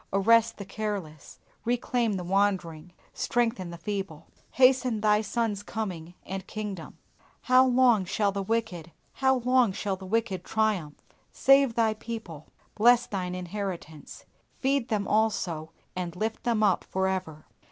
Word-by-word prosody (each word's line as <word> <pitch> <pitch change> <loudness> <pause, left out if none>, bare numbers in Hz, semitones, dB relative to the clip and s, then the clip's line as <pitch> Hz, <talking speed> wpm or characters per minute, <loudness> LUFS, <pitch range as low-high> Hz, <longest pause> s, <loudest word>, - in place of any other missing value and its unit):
Arrest 230 +4 +3
the 200 - -7
careless; 195 -8 -5 0.3
reclaim 240 -1 0
the 185 -2 -3
wandering; 180 -3 0 0.2
strengthen 230 -6 -1
the 170 - -8
feeble. 185 -3 -5 0.3
Hasten 255 -3 +4
Thy 210 0 +3
Son's 220 -1 -2
coming 180 -6 -5
and 190 0 -6
kingdom. 205 -5 -6 0.4
How 255 +1 +5
long 245 -5 +4
shall 200 +2 0
the 200 0 -3
wicked, 190 -6 -2 0.2
how 265 -1 +2
long 250 -2 +3
shall 195 0 -2
the 190 0 -10
wicked 205 -4 -1
triumph? 205 -10 -1 0.4
Save 275 -3 +4
Thy 225 -2 +2
people; 215 -9 -8 0.3
bless 240 +3 +5
Thine 180 -2 -4
inheritance; 180 -4 -6 0.3
feed 270 -2 0
them 210 -3 -1
also, 185 -7 0 0.3
and 180 -2 -4
lift 220 +4 -3
them 230 -3 +1
up 195 -4 +3
for 190 0 -1
ever. 180 -5 -4
205 Hz, 140 wpm, -27 LUFS, 180-230 Hz, 0.4 s, How